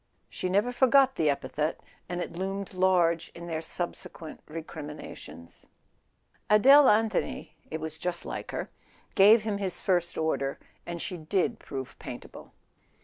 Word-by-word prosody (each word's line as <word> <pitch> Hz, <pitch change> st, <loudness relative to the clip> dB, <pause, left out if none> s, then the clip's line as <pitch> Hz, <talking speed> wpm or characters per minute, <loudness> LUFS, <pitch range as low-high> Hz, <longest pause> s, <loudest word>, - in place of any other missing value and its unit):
She 185 Hz, -, -3 dB
never 205 Hz, +6 st, +2 dB
forgot 265 Hz, +1 st, +5 dB
the 155 Hz, -2 st, +2 dB
epithet, 145 Hz, +3 st, -1 dB, 0.3 s
and 175 Hz, 0 st, -2 dB
it -, -, -4 dB
loomed 195 Hz, +2 st, -4 dB
large 175 Hz, -3 st, +2 dB
in 170 Hz, -, -8 dB
their 160 Hz, -2 st, -3 dB
subsequent 165 Hz, -1 st, -5 dB
re¬ 160 Hz, +1 st, -6 dB
criminations. 150 Hz, -, -9 dB, 0.8 s
Adele 270 Hz, +7 st, +8 dB
Anthony—it 210 Hz, -6 st, -1 dB
was 160 Hz, 0 st, -5 dB
just 175 Hz, 0 st, -3 dB
like -, -, -5 dB
her—gave 210 Hz, +3 st, +2 dB
him 210 Hz, -2 st, -2 dB
his 185 Hz, -3 st, 0 dB
first 175 Hz, -2 st, 0 dB
order, 140 Hz, -4 st, -1 dB, 0.3 s
and 170 Hz, 0 st, -4 dB
she 180 Hz, +2 st, -4 dB
did 185 Hz, +7 st, 0 dB
prove 135 Hz, -2 st, -7 dB
paintable. -, -, -9 dB
175 Hz, 135 wpm, -28 LUFS, 160-200 Hz, 0.8 s, Adele